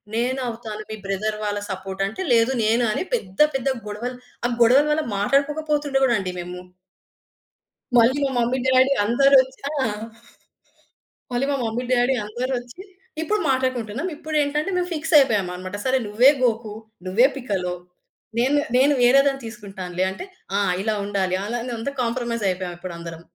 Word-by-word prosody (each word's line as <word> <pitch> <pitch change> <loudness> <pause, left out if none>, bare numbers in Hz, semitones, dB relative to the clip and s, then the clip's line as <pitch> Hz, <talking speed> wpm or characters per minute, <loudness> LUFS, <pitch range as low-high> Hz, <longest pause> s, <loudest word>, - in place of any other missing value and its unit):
నేనవుతాను. 235 -3 -2
మీ - - -3
brother 210 +2 -2
వాళ్ళ 205 -1 -1
support 190 0 -5
అంటే" 220 - -6
లేదు 230 +2 +4
నేను 230 +3 +3
అని - - -1
పెద్ద 190 - -3
పెద్ద 270 0 -2 0.2
గొడవలు 240 +5 -5 0.3
ఆ 240 - +2
గొడవల 260 +6 +6
వల్ల 310 +1 +1
మాట్లాడుకోకపోతుండే 285 +4 +1 0.2
అండి 185 -2 -3
మేము. 180 +1 -6 1.4
మళ్ళీ 240 +4 +5
మా - - 0
మమ్మీ, 240 +2 +1
డాడీ 260 +1 +4
అందరూ 275 +5 +4
వచ్చిన 260 +1 -10 0.2
ఆ - - +1 1.5
మళ్ళి 245 +3 +1
మా 280 - +1
మమ్మీ 230 +3 -2
డాడీ 250 +1 +3
అందరొచ్చి 245 - -4 0.4
ఇప్పుడు 425 +7 0
మాట్లాడుకుంటున్నాం. 255 - -1
ఇప్పుడు 310 +1 -6
ఏంటంటే 300 +5 -1
మేము 360 0 -1
ఫిక్స్ 320 +1 -3
అయిపోయామన్నమాట. 190 -7 +1
సరే 260 0 +3
నువ్వే 230 +6 +6
'గోకు,' 230 -3 0 0.3
నువ్వే 220 +8 +4
'పికలు' 190 -9 -2 0.6
నేను, 265 +4 +2 0.2
నేను 280 +3 +5
వేరే 255 +3 +6
దాన్ని 270 -1 -1
తీసుకుంటానులే 195 -5 -4
అంటే 190 - -7 0.3
ఆ! - - +2 0.2
ఇలా 220 - 0
ఉండాలి, 190 -2 0
అలా 235 +3 -2 0.2
అంతా 275 +5 -3
కాంప్రమైజ్ 235 -1 -2
అయిపోయామప్పుడు 180 -1 -5
అందరం. 165 -1 -8
240 Hz, 145 wpm, -23 LUFS, 205-270 Hz, 1.5 s, గొడవల